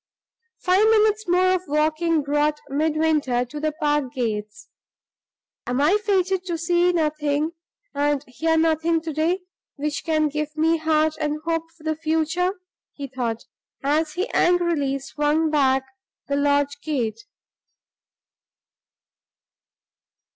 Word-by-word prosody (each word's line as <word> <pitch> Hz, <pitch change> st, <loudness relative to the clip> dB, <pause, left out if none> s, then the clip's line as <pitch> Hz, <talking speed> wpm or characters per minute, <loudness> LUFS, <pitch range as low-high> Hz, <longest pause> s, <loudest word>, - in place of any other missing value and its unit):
Five 370 Hz, +4 st, +3 dB
minutes 430 Hz, -1 st, +3 dB
more 365 Hz, +1 st, +3 dB
of 370 Hz, -, 0 dB
walking 310 Hz, +2 st, +1 dB
brought 295 Hz, +1 st, +1 dB
Midwinter 300 Hz, -4 st, +1 dB
to 295 Hz, +5 st, -8 dB
the 310 Hz, +1 st, 0 dB
park 295 Hz, -4 st, 0 dB
gates. 230 Hz, -, -4 dB, 1.0 s
"Am 250 Hz, +2 st, -1 dB
I 315 Hz, +8 st, +4 dB
fated 380 Hz, -2 st, +1 dB
to 345 Hz, -2 st, -2 dB
see 345 Hz, +2 st, +2 dB
nothing 305 Hz, -2 st, 0 dB, 0.4 s
and 290 Hz, 0 st, 0 dB
hear 320 Hz, +6 st, 0 dB
nothing 325 Hz, +1 st, +2 dB
to 320 Hz, -1 st, -5 dB
day, 330 Hz, +5 st, 0 dB, 0.3 s
which 295 Hz, 0 st, -3 dB
can 310 Hz, -2 st, +1 dB
give 300 Hz, +1 st, -4 dB
me 325 Hz, +1 st, +3 dB
heart 315 Hz, 0 st, +1 dB
and 300 Hz, 0 st, -1 dB
hope 330 Hz, 0 st, -1 dB
for 315 Hz, -, -19 dB
the 315 Hz, 0 st, -1 dB
future?" 320 Hz, +3 st, 0 dB, 0.4 s
he 285 Hz, -, -6 dB
thought, 240 Hz, -4 st, -3 dB, 0.4 s
as 300 Hz, +2 st, +1 dB
he 370 Hz, +5 st, -2 dB
angrily 340 Hz, -6 st, +2 dB
swung 300 Hz, +3 st, 0 dB
back 270 Hz, -3 st, +3 dB, 0.4 s
the 280 Hz, -, 0 dB
lodge 285 Hz, 0 st, +1 dB
gate. 230 Hz, -7 st, -2 dB
310 Hz, 125 wpm, -23 LUFS, 285-330 Hz, 1.0 s, I